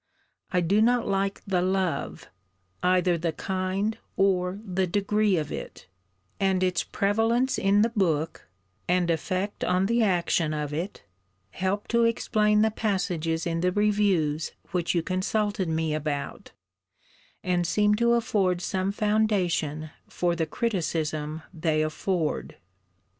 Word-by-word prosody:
I 180 - +2
do 195 +5 +2
not 240 +1 +3
like 195 0 -1
the 185 -3 +1
love 185 -5 -1 0.5
either 180 -1 +2
the 165 0 -1
kind 190 +5 -2 0.2
or 185 -1 +2
the 185 -1 0
degree 205 +1 +1
of 150 -2 -3
it - - -7 0.5
and 190 -1 +2
its 180 -2 +1
prevalence 225 +6 +1
in 200 +2 +4
the 230 - +2
book, 165 -7 -1 0.4
and 180 -1 +2
effect 185 +5 -2
on 180 +1 +2
the 235 +3 +2
action 175 -5 +1
of 150 -1 -3
it, 170 - -4 0.5
help 190 +2 -2
to 235 0 +3
explain 210 -2 +2
the 220 - +2
passages 180 -7 -1
in 165 -1 -1
the 180 +1 +2
reviews 195 -7 +1 0.2
which 175 -1 0
you 170 - +1
consulted 190 +1 -1
me 160 -1 0
about, 145 -2 -4 0.9
and 175 -1 +1
seem 210 +3 +3
to 235 +1 +3
afford 200 -6 +1
some 190 +1 -1
foundation 195 -8 0 0.2
for 175 -1 -1
the 165 -2 -1
criticism 160 -7 -2
they 155 -2 +1
afford.' 155 +1 -2
185 Hz, 130 wpm, -26 LUFS, 165-205 Hz, 0.9 s, in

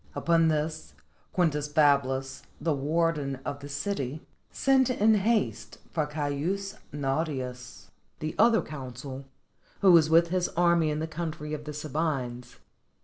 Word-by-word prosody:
Upon 165 -1 +3
this, 150 - -2 0.4
Quintus 150 -5 +1
Fablus, 140 -3 +2 0.2
the 165 - 0
warden 150 -1 0
of 140 - -4
the 140 0 -9
city, 145 -2 -3 0.2
sent 265 -2 +3
in 220 -3 +4
haste 215 +1 0
for 155 -3 0
Caius 155 +7 -3
Nautius, 135 -3 -4 0.3
the 155 0 -4
other 230 -1 +5
consul, 135 -1 -8 0.6
who 195 -2 +7
was 165 -3 +6
with 165 +1 +5
his 180 0 0
army 170 -2 +4
in 150 - -1
the 155 - -2
country 155 -2 -5
of 150 -1 -5
the 150 - -5
Sabines. 140 -5 -3
155 Hz, 135 wpm, -28 LUFS, 140-170 Hz, 0.6 s, who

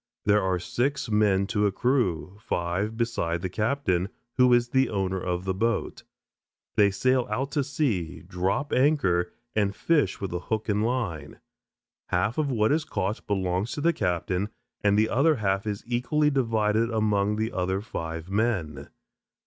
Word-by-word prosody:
There 105 0 +4
are 95 -1 +1
six 120 +5 -2
men 105 -2 +3
to 105 0 +1
a - - 0
crew, 100 - 0
five 95 +5 -2
beside 85 -8 -1
the 95 - -1
captain, 105 -4 0 0.3
who 125 -1 +5
is 120 0 +4
the 130 0 +2
owner 95 -2 -1
of 90 0 -2
the 95 - 0
boat. 115 +3 -1 0.7
They 105 -1 +5
sail 130 +5 +1
out 130 +6 -2
to 145 0 +1
sea, 115 - -2
drop 95 +10 -2
anchor, 125 - +2 0.2
and 100 -2 +1
fish 150 - +1
with 100 -2 -4
hook 105 +5 -3
and 105 +1 +1
line. 100 - -3 0.7
Half 105 - 0
of 150 -2 +1
what 110 -3 +2
is 155 +1 +2
caught 105 -8 -3
belongs 95 +2 -1
to 145 - -4
the 170 +2 +3
captain, 90 - -1 0.3
and 105 0 +4
the 110 +1 +4
other 145 +8 +3
half 100 -2 -1
is 105 -1 -3
equally 125 +6 +1
divided 115 -4 +1
among 105 -2 +1
the 110 +1 -1
other 95 +1 -1
five 80 -6 -5
men. 95 - -1
105 Hz, 160 wpm, -26 LUFS, 95-120 Hz, 0.7 s, who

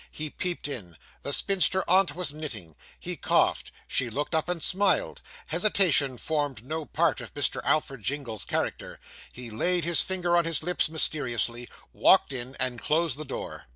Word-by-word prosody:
He 155 -1 -4
peeped 175 -5 -4
in. 90 - -7 0.2
The 140 - -4
spinster 190 +3 +4
aunt 185 +1 +4
was 175 -5 -1
knitting. 110 - -7 0.2
He - - -5
coughed; - - 0 0.2
she 125 -2 0
looked 145 +8 -4
up 160 +1 -1
and 175 -3 -2
smiled. 195 -1 +2 0.2
Hesitation 165 - +2
formed 145 -7 -3
no 155 +2 -4
part 160 -4 0
of 115 - -11
Mr. 145 -3 -1
Alfred 135 -5 0
Jingle's 125 -3 -2
character. - - -4 0.3
He 120 -2 -8
laid 175 +11 +2
his 170 +1 +5
finger 180 -2 0
on 170 -1 +2
his 165 -1 0
lips 175 -2 -1
mysteriously, 120 -6 -1 0.2
walked 190 -7 +4
in, 130 +1 -6
and 125 -2 -1
closed 160 -3 0
the - - -3
door. - - -7
150 Hz, 165 wpm, -26 LUFS, 125-175 Hz, 0.3 s, his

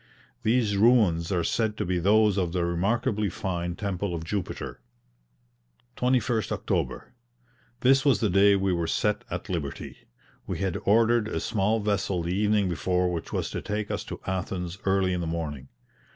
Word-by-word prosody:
These 110 -3 +2
ruins 100 -7 +4
are 90 -3 +1
said 110 +2 0
to - - -1
be 90 0 0
those 105 +2 +4
of 90 -4 -1
the 90 -2 0
remarkably 100 +4 0
fine 85 -1 -3
temple 100 -2 -3
of 80 - -5
Jupiter. 90 -7 -4 1.1
21st 125 -4 +1
October. - - -2 0.7
This 135 +1 +5
was 140 -3 +3
the 110 -5 +1
day 100 +2 +5
we 95 -1 +1
were 85 -1 -1
set 105 +4 0
at - - -5
liberty. 80 -8 -5 0.4
We - - -3
had 95 -2 -2
ordered 115 +1 +4
a - - -2
small 110 0 0
vessel 100 -4 0
the 85 +2 -2
evening 105 -1 +2
before 90 +2 0
which 85 - -5
was - - -2
to - - -4
take 105 0 -3
us - - -2
to - - -7
Athens 95 -1 -3
early 95 -1 +2
in 90 - -1
the 85 - -3
morning. 75 -5 -4
95 Hz, 165 wpm, -27 LUFS, 85-105 Hz, 1.1 s, This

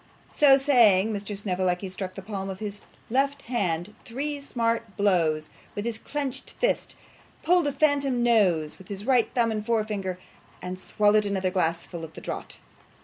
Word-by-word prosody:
So 275 -2 +7
saying, 225 -7 +4
Mr. 205 0 -4
Snevellicci 185 -1 -1
struck 185 0 -5
the 195 - -7
palm 195 -1 -4
of 190 - -5
his 205 0 -6 0.3
left 275 +2 +1
hand 195 -5 -1
three 285 +4 -3
smart 230 -5 -2
blows 165 -6 +2 0.2
with 205 - -3
his 230 -1 -3
clenched 280 -1 -4
fist; - - 0 0.5
pulled 350 -3 +3
a - - +1
phantom 275 -3 +2
nose 185 -10 +2
with 190 - -13
his 200 0 -6
right 250 -3 +3
thumb 235 -2 +3
and 215 -1 -2
forefinger, 210 -5 -1 0.4
and 180 +1 -6
swallowed 210 +1 +3
another 190 -2 0
glassful 170 -2 -1
at 160 - -10
a - - -7
draught. - - -6
210 Hz, 160 wpm, -26 LUFS, 185-245 Hz, 0.5 s, So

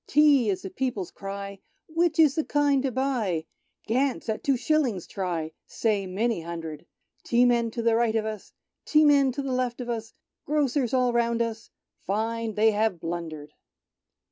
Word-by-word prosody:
Tea 285 -6 +5
is 190 - -1
the 190 - -6
people's 230 -9 -3
cry. 200 0 -7 0.3
Which 335 +1 +1
is 310 -4 +6
the 315 - 0
kind 290 -2 +2
to 270 -1 -1
buy? 235 -11 -1 0.4
Gant's 255 +1 0
at 220 - -2
Two 275 -2 +2
Shillings 250 - 0
try, 170 -5 -3 0.2
Say 205 -4 0
many 210 +1 -1
hundred! 165 -2 -7 0.4
Tea 245 +1 +3
men 235 -1 +2
to 230 +1 -4
right 230 0 +2
of 220 -1 +1
us, 215 -2 -6 0.3
Te.i 305 0 +4
men'to 280 -2 +3
left 255 -2 -1
of 245 -1 -5
us. 225 -1 -4 0.3
Grocers 280 -4 +1
all 250 -1 +2
round 235 0 +2
us, 225 -1 -6 0.3
Find 225 +2 -2
they 220 +1 +4
have 210 -4 0
blundered." 160 -3 -5
230 Hz, 160 wpm, -26 LUFS, 200-265 Hz, 0.4 s, is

